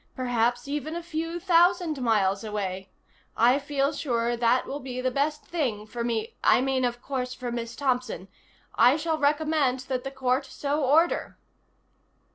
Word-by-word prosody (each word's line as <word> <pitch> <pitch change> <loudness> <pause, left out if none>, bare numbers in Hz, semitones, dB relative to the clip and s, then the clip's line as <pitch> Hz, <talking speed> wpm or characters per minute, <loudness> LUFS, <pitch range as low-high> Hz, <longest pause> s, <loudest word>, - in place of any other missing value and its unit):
Perhaps 245 0 0
even 295 +2 -3
a 345 - -4
few 330 0 -4
thousand 350 -4 +3
miles 205 -4 +2
away. 195 -3 -4 0.5
I 245 +4 +5
feel 280 0 0
sure 240 -4 -1
that 240 +2 +2
will 285 - -5
be 255 -2 -6
the 255 0 0
best 295 +3 -1
thing 245 -11 -2
for 235 +2 -5
me 225 -2 -2
I - - +5
mean, 265 0 0
of 240 0 -3
course, 255 -2 -3
for 250 -2 -5
Miss 235 0 -4
Thompson. 250 -8 -1 0.5
I 245 +5 +5
shall 320 0 -1
recommend 295 -3 +1
that 255 -1 -3
the 270 - -4
court 265 0 0
so 290 +1 -2
order." 315 +6 +2
260 Hz, 160 wpm, -26 LUFS, 240-295 Hz, 0.5 s, I